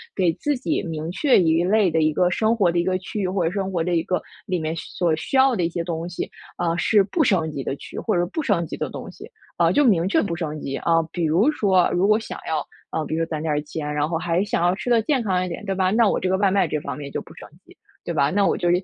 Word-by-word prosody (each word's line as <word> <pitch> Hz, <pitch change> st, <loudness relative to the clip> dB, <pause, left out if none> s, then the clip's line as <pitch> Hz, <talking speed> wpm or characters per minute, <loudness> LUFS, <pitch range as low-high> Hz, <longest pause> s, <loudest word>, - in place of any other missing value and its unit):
给 180 Hz, -4 st, +2 dB
自 295 Hz, 0 st, -1 dB
己 310 Hz, +5 st, -1 dB
明 160 Hz, -2 st, -4 dB
确 250 Hz, +9 st, +3 dB
一 165 Hz, 0 st, +3 dB
类 200 Hz, -1 st, +3 dB
的 160 Hz, -, +1 dB
一 155 Hz, 0 st, +2 dB
个 180 Hz, +3 st, +2 dB
生 220 Hz, +5 st, +2 dB
活 195 Hz, -6 st, +3 dB
的 170 Hz, -, 0 dB
一 -, -, +2 dB
个 185 Hz, 0 st, +1 dB
区 190 Hz, +3 st, -6 dB
域， 195 Hz, -, 0 dB
或 185 Hz, 0 st, -1 dB
者 165 Hz, -, 0 dB
生 195 Hz, 0 st, -2 dB
活 170 Hz, -3 st, 0 dB
的 175 Hz, +1 st, -1 dB
一 165 Hz, -, +2 dB
个， 180 Hz, +2 st, -1 dB, 0.2 s
里 185 Hz, -3 st, -1 dB
面 160 Hz, -1 st, -2 dB
所 170 Hz, 0 st, -1 dB
需 215 Hz, -, -4 dB
要 265 Hz, 0 st, +5 dB
的 180 Hz, -, 0 dB
一 -, -, 0 dB
些 170 Hz, 0 st, -3 dB
东 165 Hz, -1 st, -4 dB
西， 175 Hz, -, -5 dB, 0.3 s
啊， 170 Hz, -1 st, 0 dB
是 205 Hz, +3 st, +4 dB
不 310 Hz, -, 0 dB
升 165 Hz, -8 st, +1 dB
级 140 Hz, -, -4 dB
的 135 Hz, -, -3 dB
区 -, -, -11 dB
域， -, -, -1 dB
或 215 Hz, -, -1 dB
者 175 Hz, -, +2 dB
是 -, -, +1 dB
不 320 Hz, -, -2 dB
升 200 Hz, -, +1 dB
级 -, -, -7 dB
的 -, -, -3 dB
东 -, -, -8 dB
西， -, -, -12 dB, 0.3 s
啊， -, -, +4 dB
就 290 Hz, -, +3 dB
明 185 Hz, -9 st, +3 dB
确 315 Hz, +11 st, +2 dB
不 185 Hz, -, -2 dB
升 155 Hz, -3 st, -4 dB
级。 135 Hz, 0 st, -4 dB
啊， 165 Hz, -1 st, +2 dB
比 175 Hz, -2 st, -1 dB
如 180 Hz, -, +3 dB
说 190 Hz, -, +3 dB
如 180 Hz, +3 st, +2 dB
果 215 Hz, 0 st, +5 dB
想 225 Hz, -, -7 dB
要， 160 Hz, -1 st, -1 dB, 0.2 s
啊， 160 Hz, -, -2 dB
比 155 Hz, -, -3 dB
如 165 Hz, 0 st, 0 dB
说 -, -, -17 dB
攒 155 Hz, -2 st, -3 dB
点 160 Hz, -1 st, -1 dB
儿 150 Hz, -, 0 dB
钱， 150 Hz, 0 st, -5 dB
然 150 Hz, 0 st, 0 dB
后 165 Hz, +1 st, -1 dB
还 170 Hz, +1 st, 0 dB
想 220 Hz, -3 st, -1 dB
要 175 Hz, +1 st, +3 dB
吃 210 Hz, +5 st, -5 dB
得 235 Hz, -2 st, +4 dB
健 265 Hz, +3 st, +1 dB
康 185 Hz, -4 st, 0 dB
一 -, -, -5 dB
点， 175 Hz, +4 st, -6 dB
对 195 Hz, -1 st, -2 dB
吧？ 185 Hz, -1 st, +2 dB
那 225 Hz, +1 st, +4 dB
我 -, -, +1 dB
这 185 Hz, -, -1 dB
个 190 Hz, -, +2 dB
外 200 Hz, 0 st, +3 dB
卖 190 Hz, -2 st, +2 dB
这 150 Hz, -, -1 dB
方 135 Hz, -, -6 dB
面 140 Hz, -1 st, -7 dB
就 -, -, -3 dB
不 -, -, -14 dB
升 -, -, -12 dB, 0.2 s
级， -, -, -18 dB, 0.3 s
对 170 Hz, -, -3 dB
吧？ 140 Hz, -3 st, +2 dB
那 200 Hz, +1 st, +2 dB
我 -, -, +1 dB
就， 175 Hz, -, 0 dB
180 Hz, 335 characters per minute, -23 LUFS, 165-205 Hz, 0.3 s, 要